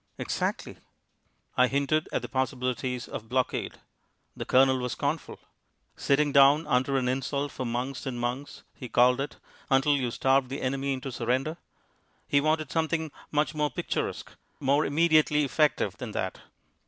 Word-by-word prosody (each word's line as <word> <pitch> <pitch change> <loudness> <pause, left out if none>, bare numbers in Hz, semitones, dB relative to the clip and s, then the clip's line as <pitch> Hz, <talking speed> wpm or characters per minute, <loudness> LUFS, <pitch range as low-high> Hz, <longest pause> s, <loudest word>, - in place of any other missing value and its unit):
"Exactly." - - -3 0.8
I 125 - +5
hinted 140 +3 0
at - - -1
the - - -4
possibilities 125 -1 -2
of 110 -5 -7
blockade. 130 0 -1 0.6
The - - -5
Colonel 130 0 +4
was 125 -1 -2
scornful. 145 +2 -3 0.6
"Sitting 145 +1 +2
down 140 +3 +6
under 130 +2 +1
an 125 -1 0
insult 135 +2 -1
for 130 - -4
months 125 +3 -3
and 125 -2 -3
months," 125 +4 -4
he 125 - -9
called 125 +3 +4
it, 145 - -5 0.3
until 135 +2 +4
you 130 -3 -1
starved 135 +2 +2
the 135 - -5
enemy 135 +1 -1
into 130 0 -5
surrender. 130 +7 -1 0.7
He 140 - +3
wanted 155 -1 0
something 160 -1 -1 0.2
much 150 +1 +1
more 150 -1 0
picturesque, 125 - -3 0.3
more 140 +2 +2
immediately 155 -1 +3
effective 150 +2 +1
than - - -6
that. - - -3
135 Hz, 150 wpm, -28 LUFS, 130-150 Hz, 0.8 s, down